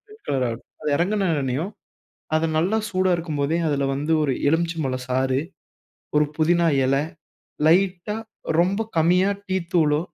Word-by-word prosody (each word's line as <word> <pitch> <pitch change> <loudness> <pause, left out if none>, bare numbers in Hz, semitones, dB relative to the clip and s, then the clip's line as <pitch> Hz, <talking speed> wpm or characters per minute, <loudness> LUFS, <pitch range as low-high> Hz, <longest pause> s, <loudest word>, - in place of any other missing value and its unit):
Red 430 +1 -15
colour 135 -2 +1
ஆகட்டும். 115 0 -6 0.2
அது 150 - -1
இறங்கின 195 +3 +1
உடனேயும் 140 +6 -2 0.7
அது 160 +1 +1
நல்லா 190 +7 +2
சூடா 185 -1 +1
இருக்கும் 160 -4 -4
போதே 145 +4 +1
அதில 140 -1 0
வந்து 150 +4 -1
ஒரு 140 -3 +1 0.2
எலுமிச்சை 165 +2 0
பழம் 130 -1 -3
சாறு. 130 +1 +1 0.8
ஒரு 150 0 +5
புதினா 170 +2 +3 0.2
இலை, 135 +2 +2 0.6
லைட்டா, 185 +4 +2 0.4
ரொம்ப 195 +5 +1 0.2
கம்மியா 180 +4 +4 0.2
டீ 190 0 -1 0.2
தூளோ, 150 -3 +3
160 Hz, 150 wpm, -23 LUFS, 140-180 Hz, 0.8 s, ஒரு